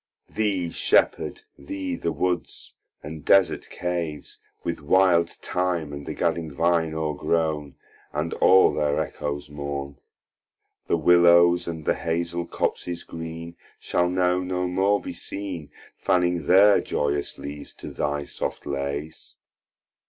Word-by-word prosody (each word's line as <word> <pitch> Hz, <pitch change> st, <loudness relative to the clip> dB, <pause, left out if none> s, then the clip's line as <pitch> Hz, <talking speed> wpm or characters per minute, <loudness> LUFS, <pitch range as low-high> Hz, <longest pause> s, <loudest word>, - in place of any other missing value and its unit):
Thee 95 Hz, -6 st, -1 dB
Shepherd, -, -, +1 dB, 0.2 s
thee 90 Hz, +5 st, -4 dB
the 85 Hz, -, -2 dB
Woods, 90 Hz, -1 st, -3 dB, 0.3 s
and 75 Hz, 0 st, -8 dB
desert 95 Hz, -5 st, +3 dB
Caves, 85 Hz, -4 st, -4 dB, 0.2 s
With 85 Hz, -1 st, -3 dB
wilde 85 Hz, +1 st, +4 dB
Thyme 90 Hz, -5 st, -2 dB
and 70 Hz, 0 st, -7 dB
the -, -, -4 dB
gadding 80 Hz, -2 st, -1 dB
Vine 80 Hz, +1 st, +1 dB
o'regrown, 75 Hz, -1 st, -1 dB, 0.4 s
And 75 Hz, +3 st, -2 dB
all 95 Hz, 0 st, +5 dB
their 75 Hz, -1 st, +1 dB
echoes 75 Hz, 0 st, -4 dB
mourn. 70 Hz, -1 st, -5 dB, 0.9 s
The -, -, +2 dB
Willows, 85 Hz, +1 st, +5 dB
and 80 Hz, -2 st, -5 dB
the -, -, +3 dB
Hazle 85 Hz, +1 st, -2 dB
Copses 85 Hz, -1 st, -2 dB
green, 80 Hz, +1 st, -7 dB, 0.2 s
Shall 90 Hz, 0 st, 0 dB
now 90 Hz, 0 st, +2 dB
no 90 Hz, 0 st, -2 dB
more 95 Hz, +3 st, +2 dB
be -, -, -7 dB
seen, 95 Hz, -7 st, -6 dB, 0.3 s
Fanning 90 Hz, -3 st, +1 dB
their 100 Hz, +3 st, +6 dB
joyous 70 Hz, 0 st, -2 dB
Leaves 70 Hz, 0 st, -8 dB
to -, -, -9 dB
thy 75 Hz, 0 st, -2 dB
soft -, -, -5 dB
layes. 70 Hz, +2 st, -5 dB
85 Hz, 125 wpm, -25 LUFS, 75-90 Hz, 0.9 s, their